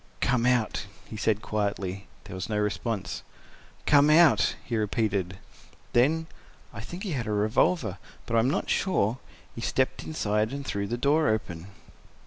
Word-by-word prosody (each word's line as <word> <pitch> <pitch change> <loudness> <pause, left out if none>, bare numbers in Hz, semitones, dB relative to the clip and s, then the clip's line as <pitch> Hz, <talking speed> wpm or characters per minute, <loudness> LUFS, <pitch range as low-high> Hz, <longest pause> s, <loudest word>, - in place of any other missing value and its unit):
"Come 125 -1 +2
out," 120 -4 +1 0.2
he - - -9
said 110 0 0
quietly. 100 -2 -2 0.2
There - - -10
was 95 +3 -5
no 105 - -1
response. 105 -2 -2 0.6
"Come—out," 145 -4 +5
he 120 - -2
repeated. 100 -4 -1 0.6
Then—I 160 +7 -1
think 175 +2 -7
he 200 - -3
had 125 -6 -2
a - - -1
revolver, 105 - +1 0.3
but 115 - -2
I - - +5
am 120 +3 +3
not - - -1
sure—he 125 - -2
stepped - - 0
aside 105 - -1
and 140 0 -5
threw 100 -4 -2
the 120 - -2
door 145 +4 +3
open. 90 -5 -2
110 Hz, 145 wpm, -27 LUFS, 100-130 Hz, 0.6 s, Come—out